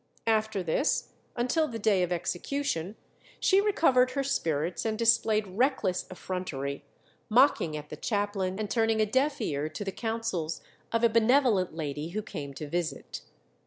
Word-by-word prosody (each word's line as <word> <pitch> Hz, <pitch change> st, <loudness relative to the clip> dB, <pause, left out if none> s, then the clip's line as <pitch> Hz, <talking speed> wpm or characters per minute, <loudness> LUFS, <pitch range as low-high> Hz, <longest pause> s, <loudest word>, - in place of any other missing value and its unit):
After 220 Hz, -3 st, +1 dB
this, 175 Hz, -, 0 dB, 0.3 s
until 255 Hz, +6 st, +1 dB
the 230 Hz, -, -5 dB
day 205 Hz, -3 st, +2 dB
of 180 Hz, -1 st, 0 dB
execution, 180 Hz, -, -2 dB, 0.4 s
she 390 Hz, +1 st, +4 dB
recovered 315 Hz, -12 st, +3 dB
her 275 Hz, 0 st, 0 dB
spirits, 165 Hz, -, -1 dB
and 220 Hz, -1 st, -1 dB
displayed 225 Hz, -2 st, +3 dB
reckless 200 Hz, -2 st, 0 dB
effrontery, 165 Hz, -7 st, -4 dB, 0.5 s
mocking 215 Hz, -, +4 dB
at 150 Hz, 0 st, -9 dB
the -, -, -6 dB
chaplain, 200 Hz, -3 st, -1 dB
and 215 Hz, 0 st, -2 dB
turning 225 Hz, 0 st, +1 dB
a 215 Hz, -, +4 dB
deaf 265 Hz, +7 st, +1 dB
ear 145 Hz, +1 st, -2 dB
to 155 Hz, +6 st, -6 dB
the 195 Hz, -, -2 dB
counsels 225 Hz, -8 st, -3 dB, 0.3 s
of 230 Hz, 0 st, 0 dB
a -, -, +8 dB
benevolent 225 Hz, -, +3 dB
lady 150 Hz, 0 st, -4 dB
who 215 Hz, -, -1 dB
came 150 Hz, -9 st, -6 dB
to 150 Hz, -, -6 dB
visit. 160 Hz, -2 st, -3 dB
210 Hz, 155 wpm, -29 LUFS, 170-235 Hz, 0.5 s, a